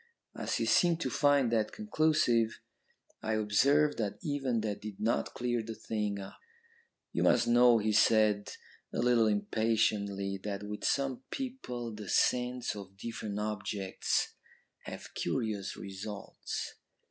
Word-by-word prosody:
"As - - -2
he - - 0
seemed 170 -2 +4
to - - -1
find 145 -4 +3
that 110 -2 +1
conclusive, 155 - +2 0.6
I 110 0 -1
observed 135 +8 +3
that 105 -3 -2
even 135 -7 0
that 105 -2 -3
did 105 -2 -7
not 115 +2 0
clear 120 -1 0
the 110 0 -6
thing 105 -3 -2
up. 95 - -9 0.7
"'You - - -1
must - - +4
know,' 120 0 +6
he 110 0 +1
said 105 -1 +4 0.4
a - - -5
little 120 -1 +4
impatiently, 105 -2 0
'that 100 -1 -4
with 105 0 -6
some 135 -3 0
people 125 - -5
the 105 -2 -8
scents 125 -1 +1
of 95 -1 -10
different 105 -1 -5
objects 105 -2 -1 0.5
have - - -8
curious 110 -6 -2
results. 100 +1 -6
110 Hz, 135 wpm, -31 LUFS, 105-125 Hz, 0.7 s, know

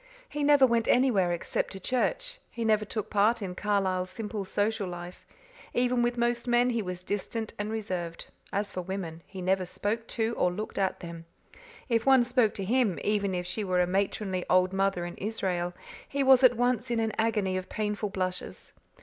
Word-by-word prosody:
He 295 - -4
never 285 -2 +6
went 235 -2 +1
anywhere 235 -9 +3
except 175 - -2
to 195 - -6
church; - - -1
he 230 -1 -4
never 215 -1 +3
took 215 0 -4
part 215 +3 +3
in 190 -4 -4
Carlisle's 190 -2 0
simple 210 0 -4
social 205 +1 0
life; 175 0 -8 0.5
even 245 0 +2
with 240 0 +1
most 240 +1 0
men 245 +1 +3
he 235 -1 0
was 180 -2 -5
distant 210 +3 -3
and 205 +1 -2
reserved; 185 -6 -4 0.3
as 200 +1 -1
for 185 - -3
women, 175 -3 -5
he 190 -2 -7
never 190 +1 +2
spoke 210 +5 -3
to 225 0 0
or 180 - +3
looked 210 +4 -5
at 190 -1 0
them; 170 -1 -8 0.6
if 230 -3 +2
one 265 -1 +6
spoke 245 -3 +2
to 195 - -3
him, 230 -4 +2
even 200 -2 +1
if 180 0 -2
she 185 +4 -3
were 185 -2 +1
a 180 - +4
matronly 190 0 -1
old 185 +1 +4
mother 195 -2 +1
in 175 - -7
Israel, 185 -4 -2 0.4
he 280 0 0
was 265 -1 +6
at 245 -2 +6
once 245 0 +1
in 235 -1 +1
an 225 -1 0
agony 210 -4 +1
of 185 0 -4
painful 210 -1 -2
blushes. 185 -1 -4
205 Hz, 190 wpm, -29 LUFS, 185-235 Hz, 0.6 s, never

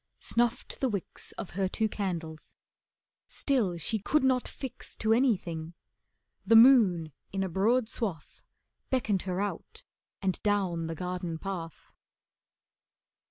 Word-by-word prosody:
Snuffed 235 -1 0
the 265 - +1
wicks 200 -5 -3
Of 195 - -7
her 190 +1 0
two 220 +3 0
candles. 170 -7 -5 0.7
Still 225 -11 0
she 215 +7 -1
could 300 +9 +1
not 260 -1 +2
fix 260 -2 -8
To 220 0 +2
anything. 175 -10 0 0.7
The 230 - +4
moon 220 -10 +6 0.2
in 195 0 -1
a 190 - -2
broad 220 +7 +2
swath 200 -10 -5 0.5
Beckoned 220 -7 +1
her 180 +1 -1
out 205 0 -4 0.4
and 190 -2 -1
down 185 -6 0
the 165 - -4
garden 180 -1 -4
path. 170 -3 -7
195 Hz, 125 wpm, -29 LUFS, 175-230 Hz, 0.7 s, moon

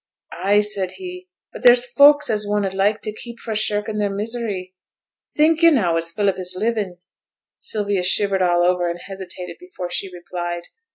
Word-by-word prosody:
'Ay!' 200 +4 +2
said 200 -3 0
he. 365 0 -9 0.2
'But - - -9
there's 245 0 +6
folk 285 +4 +5
as 210 -2 -1
one 205 0 0
'ud 190 - -3
like 200 +3 +1
to 215 - -4
keep 235 +2 -8
fra' 225 -1 -5
shirkin' 210 0 0
their 205 -1 +1
misery. 205 -3 -4 0.6
Think 315 +2 +4
yo' 335 - +8
now 200 - +2
as 165 0 0
Philip 195 +1 0
is 180 0 -2
livin'?' 210 -4 -1 0.6
Sylvia 205 -3 -1
shivered 195 +1 +1
all 175 -1 +3
over, 175 0 +2
and 170 0 -5
hesitated 190 -2 -8
before 265 - -7
she 190 +1 -3
replied. 175 -1 -5
205 Hz, 175 wpm, -21 LUFS, 180-230 Hz, 0.6 s, yo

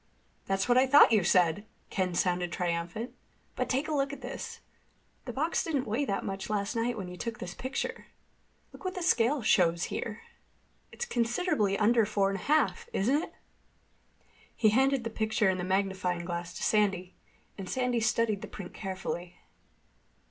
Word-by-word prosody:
"That's 195 +2 0
what 245 +1 +5
I 265 - +4
thought 285 -1 +8
you 215 -4 +4
said!" 175 +2 +3 0.3
Ken 185 -2 -1
sounded 175 -1 +1
triumphant. 175 +6 -2 0.4
"But - - -2
take 275 +4 0
a 315 - -2
look 275 -1 +1
at 285 - -8
this. - - -6 0.7
The 245 - -4
box 310 +7 0
didn't 290 -6 -1
weigh 235 +7 0
that 195 -6 -2
much 195 +1 -4
last 200 0 -1
night 230 +1 0
when 190 -3 -5
you 180 - -8
took 230 +3 -4
this 180 0 -6
picture. 260 +5 -4 0.7
Look - - -13
what 370 0 -3
the 365 - -3
scale 265 -5 +3
shows 170 -5 +3
here. 215 -1 -4 0.7
It's 485 - -4
considerably 235 - +1
under 220 +1 +4
four 195 -2 +1
and 195 - -3
a - - -9
half. 385 +10 +1
Isn't 270 - +2
it?" - - -8 1.2
He 215 - +4
handed 265 +3 +3
the 230 - -4
picture 220 -2 +1
and 185 -1 0
the - - -2
magnifying 185 -2 0
glass 175 0 -4
to - - -5
Sandy, 195 -4 +1 0.4
and 190 -2 -7
Sandy 250 -2 0
studied 220 -2 +1
the - - -6
print 195 -4 -9
carefully. 185 -3 -5
215 Hz, 175 wpm, -30 LUFS, 185-255 Hz, 1.2 s, thought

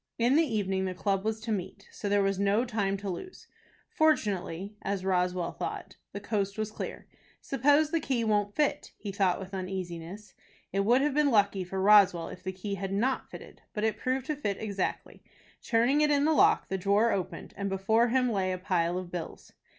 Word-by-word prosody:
In 240 +3 +3
the 320 - +6
evening 200 - 0
the 185 -1 -3
club 195 0 0
was 220 0 -1
to 225 0 -4
meet, 200 0 -4
so 205 - -4
there 205 0 +3
was 195 -1 0
no 200 +4 +2
time 205 -4 -1
to 200 +1 -7
lose. 195 - -7 0.4
Fortunately, 205 - 0
as 195 -1 -3
Roswell 180 -2 0
thought, - - -6 0.2
the 200 - -5
coast 200 -1 -2
was 215 0 -2
clear. - - -6 0.3
"Suppose 290 +3 +2
the 330 - +2
key 260 -6 -1
won't 205 -2 0
fit?" 300 -2 0
he 205 - -6
thought 190 -2 +1
with 190 0 -9
uneasiness. 185 +1 -6 0.4
It 195 - +1
would 235 +6 +4
have 295 0 +1
been 295 0 +3
lucky 200 -5 +2
for 190 +2 -5
Roswell 195 -4 +5
if - - -10
the 190 - -4
key 190 +2 -5
had 195 0 -4
not 240 +7 0
fitted. - - -12
But 210 - -2
it 220 -1 +1
proved 255 +3 -1
to 305 - -2
fit 205 -9 -2
exactly. 200 -4 -3 0.4
Turning 240 +5 +2
it 300 - +3
in 290 0 +3
the 315 - +3
lock, - - +4
the 190 - -2
drawer 205 +5 +3
opened, 185 -3 -4
and 200 0 -3
before 220 +5 +2
him 250 0 +2
lay 190 -3 0
a 185 - -2
pile 180 -2 0
of 185 -1 -6
bills. 175 -2 -7
200 Hz, 205 wpm, -29 LUFS, 190-235 Hz, 0.4 s, the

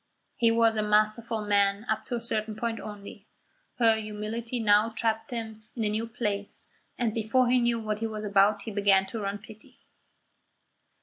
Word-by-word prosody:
He 230 - +3
was 230 0 +3
a - - +2
masterful 215 +1 +1
man 200 +1 +2
up 220 - -1
to 245 - -3
a 235 - -4
certain 220 -2 -2
point 230 0 -3
only. 205 0 -9 0.5
Her 230 -2 +5
humility 220 +3 -4
now 210 0 +4
tapped 225 +1 -1
him 220 -3 -5
in 230 - -2
a 210 - +1
new 220 +2 -2
place, 210 -4 -4 0.3
and 235 -3 0
before 230 +3 +2
he 255 - +5
knew 235 -1 +1
what 215 -1 -3
he 225 - -1
was 215 -1 -5
about 200 +1 +3
he 225 - -5
began 200 -2 +3
to 225 +4 -6
run 200 0 -3
pity. 215 +1 -16
220 Hz, 180 wpm, -28 LUFS, 210-230 Hz, 0.5 s, Her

